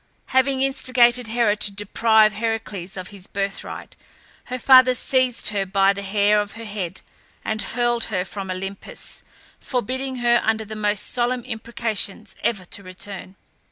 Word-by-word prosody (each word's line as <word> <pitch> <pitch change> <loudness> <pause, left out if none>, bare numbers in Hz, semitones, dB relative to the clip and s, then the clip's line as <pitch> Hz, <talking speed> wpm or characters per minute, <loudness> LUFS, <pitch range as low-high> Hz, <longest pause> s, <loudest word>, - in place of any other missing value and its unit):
Having 260 +1 +2
instigated 250 -3 +3
Hera 225 -2 +2
to 210 - +2
deprive 215 +2 +3
Heracles 215 -5 -4
of 185 -1 -6
his 200 -2 -4
birthright, 195 0 -5 0.5
her 255 - -4
father 255 0 +7
seized 255 -1 +1
her 205 -2 0
by 195 +1 +3
the 200 - -6
hair 205 +1 +2
of 205 0 -6
her 230 0 -8
head, 185 -4 -5 0.4
and 215 0 -1
hurled 240 -1 0
her 185 -4 -2
from 195 -1 -6
Olympus, 195 +2 -7 0.4
forbidding 260 +2 -3
her, 240 -1 +3
under 220 0 0
the 215 +1 -7
most 210 -1 +1
solemn 245 0 0
imprecations, 220 -2 -3
ever 200 -6 -1
to 200 - -7
return. 190 0 -7
215 Hz, 150 wpm, -22 LUFS, 200-240 Hz, 0.5 s, father